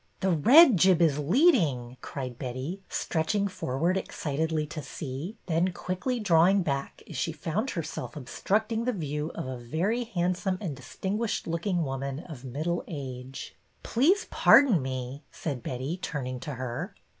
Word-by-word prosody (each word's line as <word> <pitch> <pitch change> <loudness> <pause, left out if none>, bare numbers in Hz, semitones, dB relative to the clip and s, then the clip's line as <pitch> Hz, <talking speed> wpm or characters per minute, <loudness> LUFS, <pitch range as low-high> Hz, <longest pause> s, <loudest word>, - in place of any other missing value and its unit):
The 190 - +2
red 245 - +7
jib 185 0 +5
is 155 -4 +3
leading," 155 - +3
cried 125 -4 -6
Betty, 130 +9 -4
stretch 160 +4 -1
ing 200 -1 +2
forward 175 -1 -1
excitedly 160 -2 -2
to 155 +1 -6
see, 145 - -6
then 175 +2 +1
quickly 185 +9 -2
drawing 185 -1 +4
back 140 -3 -3
as - - -9
she 165 - -1
found 165 - -2
herself 165 - -5
obstructing 215 - -1
the 250 - +1
view 150 -4 -3
of - - -4
a 130 -1 -4
very 185 - -1
handsome 185 -2 -1
and 170 -9 -4
distinguished 195 - -3
looking 170 +1 0
woman 135 +1 -3
of 155 -8 -10
middle 155 +7 -2
age. 130 -4 -7
'' - - -38
Please 355 - +3
pardon 250 - +6
me," 130 +1 -4
said 140 -6 -4
Betty, 130 +8 -3
turning 130 -7 -4
to 140 +2 -5
her. 125 -1 -4
160 Hz, 155 wpm, -28 LUFS, 135-190 Hz, -, red